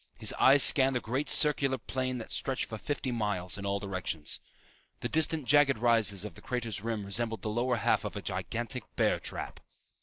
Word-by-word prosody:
His -, -, +3 dB
eyes 135 Hz, +1 st, +6 dB
scanned 135 Hz, -1 st, +4 dB
the -, -, +1 dB
great 130 Hz, +6 st, -2 dB
circular 140 Hz, -3 st, +4 dB
plain 130 Hz, +1 st, -3 dB
that 115 Hz, -, -8 dB
stretched 135 Hz, -2 st, -2 dB
for 110 Hz, -, -7 dB
fifty 140 Hz, -1 st, -3 dB
miles 105 Hz, -6 st, -1 dB
in 100 Hz, -1 st, -5 dB
all 100 Hz, 0 st, 0 dB
directions. 95 Hz, -6 st, -3 dB, 0.6 s
The -, -, -2 dB
distant 160 Hz, -2 st, +1 dB
jagged 135 Hz, 0 st, +4 dB
rises 110 Hz, -4 st, +2 dB
of 105 Hz, -, -7 dB
the -, -, -14 dB
crater's 115 Hz, -5 st, -4 dB
rim 110 Hz, -2 st, -3 dB
resembled 115 Hz, +3 st, -2 dB
the 110 Hz, -, -2 dB
lower 120 Hz, +3 st, 0 dB
half 115 Hz, -, +1 dB
of -, -, -5 dB
a -, -, -4 dB
gigantic 120 Hz, 0 st, -4 dB
bear -, -, +2 dB
trap. -, -, -5 dB
120 Hz, 190 wpm, -30 LUFS, 105-130 Hz, 0.6 s, eyes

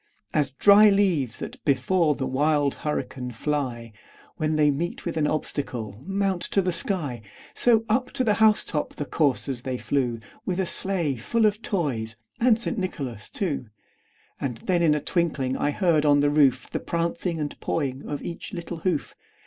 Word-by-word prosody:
As 145 Hz, -3 st, +2 dB
dry 200 Hz, +10 st, +7 dB
leaves 180 Hz, -, +2 dB
that -, -, -8 dB
before 155 Hz, +2 st, +2 dB
the 130 Hz, -, -3 dB
wild 145 Hz, +2 st, +2 dB
hurricane 130 Hz, -4 st, -4 dB
fly, 125 Hz, -3 st, -3 dB, 0.4 s
When 155 Hz, 0 st, 0 dB
they 150 Hz, -1 st, +4 dB
meet 170 Hz, +5 st, -3 dB
with 170 Hz, -, -3 dB
an 155 Hz, -2 st, +1 dB
obstacle, 120 Hz, -8 st, -3 dB
mount 195 Hz, -2 st, 0 dB
to 195 Hz, -, +1 dB
the 180 Hz, -, +1 dB
sky, 155 Hz, -, -1 dB, 0.3 s
So, 225 Hz, -2 st, +3 dB
up 250 Hz, +4 st, +1 dB
to 265 Hz, -2 st, 0 dB
the 215 Hz, -4 st, +3 dB
house 215 Hz, -1 st, +5 dB
top 150 Hz, -2 st, -3 dB
the 145 Hz, -, -4 dB
coursers 135 Hz, -4 st, 0 dB
they 130 Hz, 0 st, -3 dB
flew, 125 Hz, -4 st, -1 dB, 0.2 s
With 185 Hz, -1 st, -2 dB
a 190 Hz, -, +1 dB
sleigh 170 Hz, -7 st, -1 dB
full 220 Hz, -, +1 dB
of 210 Hz, +1 st, +1 dB
toys 130 Hz, -, -2 dB, 0.2 s
and 230 Hz, -2 st, +4 dB
St. 235 Hz, 0 st, -2 dB
Nicholas 135 Hz, -, -4 dB
too. 150 Hz, -, -3 dB, 0.7 s
And 125 Hz, -4 st, -3 dB
then 180 Hz, -2 st, +2 dB
in 155 Hz, -3 st, +4 dB
a -, -, 0 dB
twinkling 150 Hz, -7 st, 0 dB
I 145 Hz, -, 0 dB
heard 160 Hz, -1 st, +2 dB
on 145 Hz, -1 st, +5 dB
the 145 Hz, 0 st, +3 dB
roof, 135 Hz, -4 st, +3 dB
The -, -, -2 dB
prancing 170 Hz, 0 st, -2 dB
and 150 Hz, -1 st, -3 dB
pawing 135 Hz, -4 st, -2 dB
of 145 Hz, -, -4 dB
each 170 Hz, +4 st, -6 dB
little 170 Hz, -1 st, -5 dB
hoof. 165 Hz, -2 st, -1 dB
150 Hz, 175 wpm, -25 LUFS, 135-185 Hz, 0.7 s, dry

